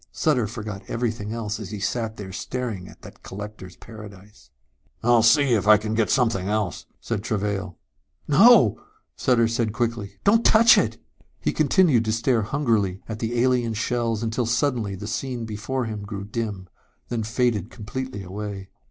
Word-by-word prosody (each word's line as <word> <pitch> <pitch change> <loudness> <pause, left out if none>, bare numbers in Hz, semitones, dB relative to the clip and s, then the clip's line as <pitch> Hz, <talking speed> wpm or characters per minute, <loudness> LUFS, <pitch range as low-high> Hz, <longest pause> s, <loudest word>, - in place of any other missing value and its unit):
Sutter 130 -9 +1
forgot 105 -3 -6
everything 110 -3 -3
else 110 -2 -3
as 105 -4 -7
he 105 -1 -6
sat 110 +2 -2
there 95 -2 -8
staring 110 -4 -4
at - - -16
that - - -13
collector's 100 -2 -9
paradise. 105 - -13 0.5
"I'll 120 0 +5
see 130 +3 +4
if 105 -2 +1
I 110 0 +8
can 105 +1 -4
get 110 -1 +1
something 110 -7 +1
else," 105 -3 -2
said 115 -4 -3
Travail. 100 -4 -3 0.5
"No!" 190 - +6 0.3
said 125 -2 +2
Sutter 115 -1 0
quickly. 115 -3 -2
"Don't 225 +3 +4
touch 230 +1 +7
it!" - - +1 0.4
He - - -1
continued 160 - +3
to 110 - 0
stare 115 +1 +1
hungrily 105 -6 0
at 110 -1 -5
the 120 +1 -2
alien 125 -3 +1
shells 115 -1 -1
until 115 +1 -1
suddenly 120 -4 0
the 100 +2 -8
scene 120 +2 -3
before 120 +4 -3
him 110 -2 -5
grew 100 -1 -6
dim, 105 -3 -4 0.4
then 120 -2 -2
faded 115 -2 0
completely 120 -1 -6
away. 100 0 -6
110 Hz, 160 wpm, -24 LUFS, 105-120 Hz, 0.5 s, I